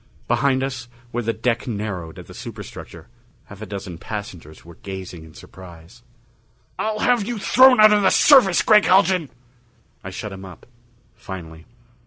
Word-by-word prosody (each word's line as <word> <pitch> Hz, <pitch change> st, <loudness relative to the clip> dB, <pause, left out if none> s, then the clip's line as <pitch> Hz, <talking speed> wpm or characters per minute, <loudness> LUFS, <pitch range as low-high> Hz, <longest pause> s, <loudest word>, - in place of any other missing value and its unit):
Behind 135 Hz, -1 st, +1 dB
us, 130 Hz, -3 st, -5 dB, 0.2 s
where 120 Hz, -, -2 dB
the 115 Hz, 0 st, -1 dB
deck 115 Hz, +3 st, -2 dB
narrowed 100 Hz, -7 st, -5 dB
at -, -, -10 dB
the -, -, -13 dB
superstructure, -, -, -10 dB, 0.4 s
half 100 Hz, +1 st, -14 dB
a 110 Hz, -, -7 dB
dozen 95 Hz, -4 st, -8 dB
passengers 90 Hz, -8 st, -9 dB
were 85 Hz, -, -13 dB
gazing 95 Hz, -4 st, -8 dB
in 80 Hz, -1 st, -16 dB
surprise. 90 Hz, +4 st, -14 dB, 0.8 s
"I'll 215 Hz, -1 st, -2 dB
have 240 Hz, 0 st, +1 dB
you 240 Hz, -1 st, -3 dB
thrown 255 Hz, +4 st, +5 dB
out 215 Hz, 0 st, +7 dB
of 210 Hz, -, +3 dB
the 190 Hz, -, +4 dB
service, 240 Hz, -, +5 dB
Gregg 210 Hz, -2 st, +5 dB
Haljan!" 185 Hz, -5 st, +3 dB, 0.7 s
I -, -, -7 dB
shut 105 Hz, -, -7 dB
him 95 Hz, 0 st, -10 dB
up 95 Hz, -2 st, -13 dB, 0.5 s
finally. 80 Hz, -3 st, -10 dB
110 Hz, 160 wpm, -21 LUFS, -, 0.8 s, out